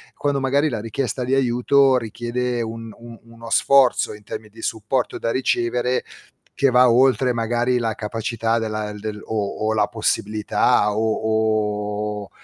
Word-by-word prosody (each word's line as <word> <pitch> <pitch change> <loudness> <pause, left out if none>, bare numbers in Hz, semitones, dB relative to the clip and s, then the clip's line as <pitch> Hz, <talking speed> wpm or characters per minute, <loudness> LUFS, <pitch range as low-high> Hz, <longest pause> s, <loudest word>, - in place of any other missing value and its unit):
quando 145 -1 -1
magari 140 +3 +1
la 115 -5 -3
richiesta 125 +3 -3
di 130 +2 +1
aiuto 130 +1 +3
richiede 120 +1 -3
un 115 0 -6
un 115 -1 -12
uno 115 0 -12
sforzo 135 0 +3
in 105 0 -13
termi 110 +1 -7
di 115 +2 -14
supporto 115 +4 -2
da 115 - -1
ricevere, 125 0 0 0.5
che 135 - +2
va 125 0 +6
oltre 130 +1 +3
magari 120 +2 0
la 115 -2 -1
capacità 115 +1 -2
della 110 -1 -3
del 105 0 -6
o 110 0 -3
o 110 - +1
la 110 - +2
possibilità 105 -2 +1
o 110 0 +1 1.1
o - - -20
115 Hz, 150 wpm, -21 LUFS, 110-125 Hz, 1.1 s, va